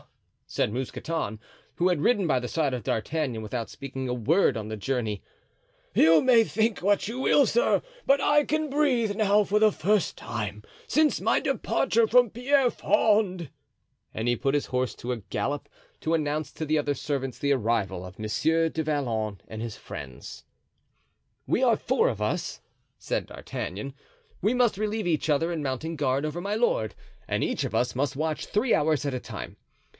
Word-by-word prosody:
said 105 - -1
Mousqueton, 130 -2 -3 0.4
who 175 - +2
had 175 -5 +1
ridden 205 -2 +2
by 130 - +3
the 125 0 -2
side 150 -5 0
of 125 -3 -3
D'Artagnan 125 +2 -2
without 115 +1 -4
speaking 130 -1 -6
a - - 0
word 130 - +2
on 105 -1 -5
the 110 - -4
journey, 110 -2 -2 0.7
"you 160 0 +6
may 245 -3 +5
think 220 0 0
what 200 +1 +2
you 235 +4 -4
will, 280 +1 +4
sir, 485 - +2 0.2
but 275 +1 +4
I 295 +2 +4
can 310 +1 -1
breathe 260 -7 +1
now 210 -1 +3
for 210 +2 +2
the 215 0 +5
first 205 -1 +1
time 105 -2 -5 0.2
since 305 0 +2
my - - +3
departure 230 0 +1
from 240 0 +4
Pierrefonds;" 220 - +2 0.7
and 110 +2 -3
he 120 - +3
put 135 +4 0
his 145 - +1
horse 130 -1 -1
to 125 +1 -3
a - - -4
gallop 140 +7 -3 0.3
to 165 +1 +1
announce 155 0 -1
to 160 - -4
the 155 0 +2
other 145 -1 0
servants 135 -2 -3
the 140 0 +2
arrival 105 -7 -1
of 90 +2 -12
Monsieur 160 +10 +1
du 160 0 -2
Vallon 115 - -1
and 110 0 -7
his 115 -2 -5
friends. 65 -4 -9 1.0
"We - - +1
are - - +4
four - - +2
of - - -4
us," - - -2 0.4
said - - -3
D'Artagnan; 105 +9 -6 0.5
"we 210 +6 +2
must 245 -5 +2
relieve 215 -1 -1
each 160 -2 0
other 165 +4 +2
in 155 -3 -3
mounting 140 +5 -3
guard 140 -1 0
over 155 +3 -3
my 200 +3 -2
lord 215 - +1 0.4
and - - 0
each - - -1
of - - -4
us 125 - 0
must 135 +1 -1
watch 155 0 -2
three 225 +4 +1
hours 150 -1 +2
at 140 - -1
a 130 - -2
time. - - -8
155 Hz, 180 wpm, -27 LUFS, 125-210 Hz, 1.0 s, you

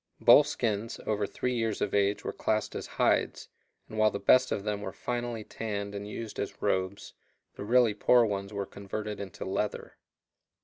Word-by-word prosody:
Bull 150 - +8
skins 115 -6 -2
over 105 -1 0
three 125 +5 -2
years 115 -3 -1
of 105 - -1
age 100 0 +2
were - - -2
classed 110 0 -1
as - - -5
hides, - - +1 0.4
and 110 - -6
while 110 0 +5
the 100 - -4
best 130 +4 +4
of 100 - -1
them 105 -1 -2
were 95 - -4
finally 120 -1 -3
tanned 100 -2 -4
and 100 0 -5
used 110 0 -6
as - - -4
robes, 95 +1 -1 0.4
the - - -7
really 120 0 +4
poor 120 +3 +4
ones 100 -1 -3
were 100 -1 -3
converted 105 +2 -6
into 100 -3 -6
leather. - - -3
105 Hz, 180 wpm, -29 LUFS, 100-115 Hz, 0.4 s, Bull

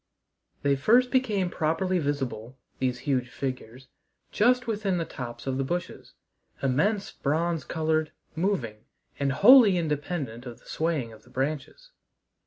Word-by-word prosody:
They 140 -1 +3
first 240 - +4
became 210 -9 +1
properly 170 +4 0
visible, 135 -5 -3 0.2
these 125 -1 -1
huge 130 -3 0
figures, 130 0 -6 0.4
just 250 +3 +3
within 205 -5 -1
the 165 - -1
tops 120 -4 -7
of 135 0 -2
the - - +1
bushes 175 +5 -5 0.5
immense 195 - +1
bronze 160 +3 -1
colored, 155 -1 0 0.2
moving, 130 - -2 0.3
and 140 -1 +1
wholly 210 - +7
independent 145 -6 -3
of 120 - -8
the - - -25
swaying 155 -8 -2
of 110 - -15
the - - -21
branches. 155 - -4
155 Hz, 135 wpm, -27 LUFS, 130-185 Hz, 0.5 s, wholly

